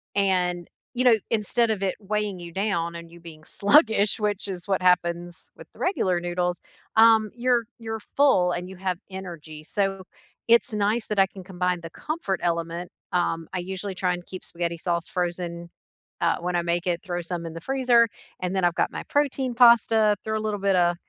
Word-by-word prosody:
and, 180 -3 +1 0.2
you 250 0 0
know, 245 -3 +7 0.2
instead 225 +1 +2
of 210 -3 -2
it 190 - 0
weighing 210 -1 -2
you 170 -1 -8
down 170 -3 -1
and 170 0 -9
you 170 - -13
being 165 -2 -12
sluggish, 215 -2 +3
which 210 -2 -1
is 180 -3 -6
what 195 -2 +1
happens 175 -1 +1
with - - -13
the - - -19
regular 190 - +1
noodles, 175 0 -2 0.3
um, 220 -1 +6
you're 245 -1 +2 0.2
you're 225 -1 -4
full 210 -7 +3
and 180 +1 -4
you 190 - -9
have 185 -2 -2
energy, 170 -5 -8
so 195 +2 -1 0.4
it's 230 -1 +4
nice 210 +2 0
that 210 - -3
I 195 - +6
can 190 -1 -11
combine 180 -1 -2
the 165 - -8
comfort 295 - -3
element. 170 +1 -2 0.2
Um, 165 -2 0
I 185 - -1
usually 190 +2 -5
try 180 -1 0
and 175 0 -7
keep 185 - -9
spaghetti 170 0 -3
sauce 170 0 -1
frozen, 175 -1 -3 0.5
uh, 170 - +2
when 180 +1 -2
I - - +1
make 170 +1 -1
it, 175 -1 0
throw 175 -1 -3
some 170 0 -4
in 165 - -6
the 165 - -8
freezer, 250 -1 +3 0.3
and 180 0 -2
then 190 -2 +2
I've 175 - +3
got - - +1
my - - -5
protein 270 -3 0
pasta, 225 -3 +5
throw 220 0 -1
a - - -4
little 215 -1 -2
bit 195 -1 +2
a 175 -1 +3
185 Hz, 200 wpm, -25 LUFS, 175-215 Hz, 0.5 s, know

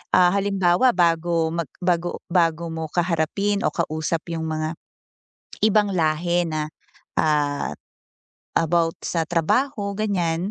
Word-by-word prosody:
ah, 180 -1 +6
halimbawa 195 +3 +3
bago 165 -1 +2
mag 170 -4 -2
bago 175 -1 0
bago 170 -1 +2
mo 160 0 -3
kaharapin 180 +4 0
o - - +2
kausap 160 0 -1
'yung 160 -1 -3
mga, 155 +1 -2 0.9
ibang 210 -1 +3
lahi 170 +2 +1
na, 155 -1 -2 0.5
ah, 145 - +1 0.9
about 165 0 +2
sa 165 -2 0
trabaho 200 - 0
ganiyan, 185 -4 -1
170 Hz, 115 wpm, -23 LUFS, 160-185 Hz, 0.9 s, ah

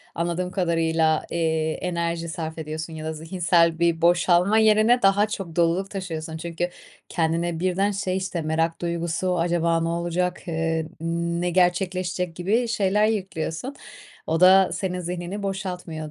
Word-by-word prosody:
anladığım 175 +2 -2
kadarıyla, 165 -3 +1
eee, 160 -1 0
enerji 170 -1 -2
sarf 160 -1 -5
ediyorsun 160 +1 -5
ya 155 0 -7
da 160 - -2
zihinsel 165 0 +1
bir 170 -1 +2
boşalma 175 +4 +4
yerine 220 +3 +4
daha 200 +2 +4
çok 195 -6 -6
doluluk 175 +3 +1
taşıyorsun. 165 -5 -5
Çünkü 170 +1 -3 0.4
kendine 165 0 0
birden 185 +3 +1
şey, 190 -2 -2
işte, 185 -2 -3
merak 165 +2 -1
duygusu, 170 +1 -1
"Acaba 170 -1 +1
ne 165 - -1
olacak, 175 +2 -2
eee, 160 -1 -1 0.5
ne 180 0 0
gerçekleşecek?" 180 0 0
gibi 215 +8 +1
şeyler 210 -2 +2
yüklüyorsun. 195 - -3 0.5
O 160 +2 0
da 190 +1 +7
senin 180 -2 -2
zihnini 180 +3 -5
boşaltmıyor, 180 -5 -4
175 Hz, 140 wpm, -24 LUFS, 165-185 Hz, 0.5 s, da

